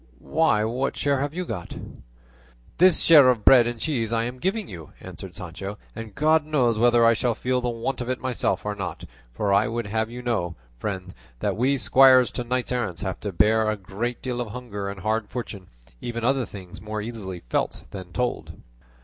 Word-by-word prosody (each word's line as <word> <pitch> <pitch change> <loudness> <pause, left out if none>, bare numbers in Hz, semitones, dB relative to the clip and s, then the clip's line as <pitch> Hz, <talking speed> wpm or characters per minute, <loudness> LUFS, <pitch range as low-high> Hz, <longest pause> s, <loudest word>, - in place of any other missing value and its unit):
"Why, 155 -10 +3
what 125 +5 -1
share 140 -2 +1
have 145 +3 -2
you 180 0 -2
got?" 95 - -6 1.0
"This 185 -1 +6
share 150 -6 +8
of 120 -4 +1
bread 125 -3 +7
and 120 -1 -4
cheese 115 -7 -1
I 115 -1 +1
am 125 +2 -5
giving 195 - -1
you," 85 -5 -10
answered 95 0 -9
Sancho; 95 +1 -7 0.2
"and 115 -3 -8
God 155 +1 +3
knows 130 -7 +1
whether 120 0 +5
I 115 - +6
shall 120 0 0
feel 125 0 0
the 125 - -1
want 120 +3 -3
of 120 - -4
it 130 - -1
myself 130 -4 -1
or 105 - -1
not; 100 -3 -5 0.3
for 100 +11 0
I 100 +5 +4
would 120 0 -3
have 110 +2 -1
you 125 +1 -8
know, 95 -9 -1 0.2
friend, 95 0 -4 0.3
that - - -1
we 130 +5 +2
squires 130 -1 +6
to 125 - -3
knights 125 +1 -1
errant 110 -9 -2
have 95 -2 -3
to 100 - -4
bear 110 +4 +3
a 110 - -1
great 110 +5 -4
deal 125 -1 -2
of 120 - -3
hunger 105 -4 -5
and 100 -1 -7
hard 110 +1 -1
fortune, 105 -6 -6
and - - -28
even 115 -1 -4
other 130 0 +1
things 95 -3 -10
more 105 0 -4
easily 100 -6 -6
felt - - -1
than 95 -2 -8
told." 125 +6 -2
115 Hz, 205 wpm, -25 LUFS, 100-125 Hz, 1.0 s, share